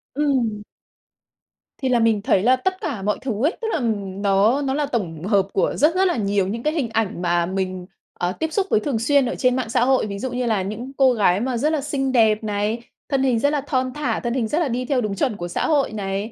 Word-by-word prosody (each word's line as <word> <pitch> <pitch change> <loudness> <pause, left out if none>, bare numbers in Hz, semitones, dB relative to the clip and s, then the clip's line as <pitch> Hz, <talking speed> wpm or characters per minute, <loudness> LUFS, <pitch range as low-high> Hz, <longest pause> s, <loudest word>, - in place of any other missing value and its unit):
Ừm. 250 -8 0 1.2
Thì 260 - 0
là 245 - +3
mình 225 -2 +2
thấy 195 -2 +2
là 255 +3 +5
tất 375 +9 -2
cả 270 - -3
mọi 210 +1 0
thứ 240 -4 -3
ấy, 330 - 0
tức 450 - -2
là - - 0 0.3
nó 200 +6 +2
nó 270 -1 -1
là 295 +1 0
tổng 180 - -3
hợp 195 -1 +2
của - - +1
rất 310 +5 +3
rất 380 - +3
là 350 - 0
nhiều 200 -2 +1
những 230 +4 -4
cái 305 +1 +1
hình 275 -8 -1
ảnh 220 -5 -1
mà 175 -1 +1
mình, 185 -1 -3 0.3
ờ, 180 0 -2
tiếp 320 0 -2
xúc 395 -1 +1
với - - +3
thường 230 0 -2
xuyên 275 +4 +3
ở 245 - -2
trên 250 0 +2
mạng 255 -3 -2
xã 235 - +2
hội. 265 -2 +3
Ví 200 -1 -5
dụ 260 +2 -3
như 250 0 -2
là 220 -4 +1
những 215 +7 -5
cô 265 -2 +5
gái 200 -4 +2
mà 250 0 -1
rất 295 +6 +1
là 310 -3 0
xinh 270 -2 -1
đẹp 220 -3 +3
này, 210 +2 -1 0.3
thân 270 -2 +1
hình 250 -4 +2
rất 285 - +2
là 295 -1 0
thon 260 -2 -1
thả, 295 0 -1
thân 240 -1 -2
hình 245 -4 0
rất 300 +9 0
là 330 - +1
đi 250 +1 -2
theo 255 -1 +1
đúng 205 -2 -2
chuẩn 245 0 0
của 175 -3 -5
xã 175 - -2
hội 285 -7 +1
này, 200 +1 -3
235 Hz, 260 wpm, -22 LUFS, 205-270 Hz, 1.2 s, là